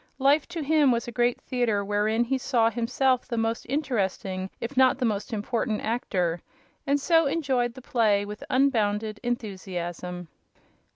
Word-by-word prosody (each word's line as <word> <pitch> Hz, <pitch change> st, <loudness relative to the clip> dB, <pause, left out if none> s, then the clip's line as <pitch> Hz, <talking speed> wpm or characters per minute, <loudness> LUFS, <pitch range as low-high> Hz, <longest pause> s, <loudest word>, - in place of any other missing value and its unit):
Life, 280 Hz, +3 st, +3 dB
to 340 Hz, -3 st, -5 dB
him, 300 Hz, -1 st, +4 dB
was 235 Hz, 0 st, -1 dB
a -, -, -4 dB
great 240 Hz, +1 st, +1 dB
theater 225 Hz, -5 st, -1 dB
wherein 210 Hz, +3 st, +1 dB
he 260 Hz, +2 st, -1 dB
saw 235 Hz, -3 st, +2 dB
himself 250 Hz, +2 st, +1 dB
the 235 Hz, -, -3 dB
most 225 Hz, +1 st, -1 dB
interesting 195 Hz, -9 st, -2 dB
if 235 Hz, +4 st, -5 dB
not 260 Hz, 0 st, +5 dB
the 255 Hz, -, 0 dB
most 210 Hz, +2 st, -2 dB
important 220 Hz, +1 st, -1 dB
actor, 180 Hz, -7 st, -1 dB, 0.5 s
and 285 Hz, +1 st, +2 dB
so 325 Hz, +1 st, +3 dB
enjoyed 265 Hz, -6 st, 0 dB
the 260 Hz, -, -11 dB
play 210 Hz, -5 st, +2 dB
with 210 Hz, +1 st, -8 dB
unbounded 215 Hz, -5 st, +1 dB
enthusiasm. 180 Hz, -6 st, -4 dB
235 Hz, 155 wpm, -26 LUFS, 205-260 Hz, 0.5 s, not